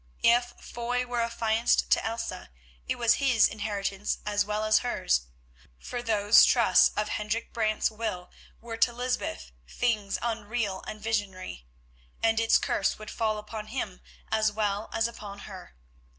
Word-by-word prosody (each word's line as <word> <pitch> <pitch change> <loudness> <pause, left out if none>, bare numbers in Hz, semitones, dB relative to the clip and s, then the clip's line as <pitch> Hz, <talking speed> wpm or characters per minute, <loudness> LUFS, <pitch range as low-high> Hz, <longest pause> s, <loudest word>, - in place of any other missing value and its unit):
If 240 +1 +3
Foy 245 +1 -3
were 245 -1 -1
affianced 230 0 +1
to - - +4
Elsa, 225 -4 -4 0.4
it - - 0
was 235 -1 +3
his 255 -5 +5
inheritance 205 -2 -3
as 205 0 +1
well 210 +1 -2
as 215 0 +5
hers, 185 - 0 0.5
for 240 - -5
those 215 -2 +5
trusts - - +5
of 210 0 0
Hendrik 210 +2 -3
Brant's 220 -1 +1
will 215 -5 -4 0.3
were 230 0 -7
to 240 +1 +3
Lysbeth 245 - -3 0.2
things 215 -5 -1
unreal 220 -3 -2
and 215 - -6
visionary, 195 - -3 0.6
and 225 0 +3
its 225 0 +4
curse 195 - 0
would 215 0 -9
fall 220 -2 0
upon 215 0 -7
him 215 -6 -4 0.3
as 220 -1 +2
well 205 0 -1
as 225 - +1
upon 205 -3 -9
her. 185 - -11
215 Hz, 150 wpm, -28 LUFS, 205-230 Hz, 0.6 s, his